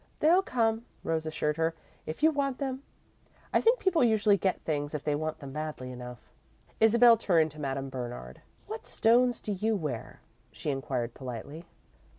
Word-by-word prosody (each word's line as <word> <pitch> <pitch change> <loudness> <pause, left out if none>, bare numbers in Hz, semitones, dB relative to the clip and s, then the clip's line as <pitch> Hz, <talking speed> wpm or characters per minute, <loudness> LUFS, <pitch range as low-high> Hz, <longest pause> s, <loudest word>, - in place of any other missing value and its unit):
"They'll 340 +5 +5
come," 225 -8 0 0.2
Rose 160 -1 -1
assured 150 -1 -1
her, 165 0 0 0.3
"if 155 - -6
you 320 - +7
want 275 -3 -1
them. 265 -2 -3 0.7
I - - +4
think 465 +2 +4
people 375 - +2
usually 215 -3 +4
get 190 -1 0
things 145 -1 -2
if 150 - -4
they 150 - 0
want 155 +1 -2
them 140 -2 -9
badly 150 -4 -5
enough." 125 -1 -9 0.5
Isabel 230 +1 +7
turned 165 -7 +2
to 150 +1 -10
Madame 135 -1 -3
Bernard. 120 - -7 0.2
"What - - -7
stones 240 +2 +3
do 210 - -4
you 215 +3 0
wear?" 150 - -4 0.3
she 120 +7 -3
inquired, 130 -4 -3
politely. 135 +6 -7
160 Hz, 165 wpm, -29 LUFS, 135-230 Hz, 0.7 s, you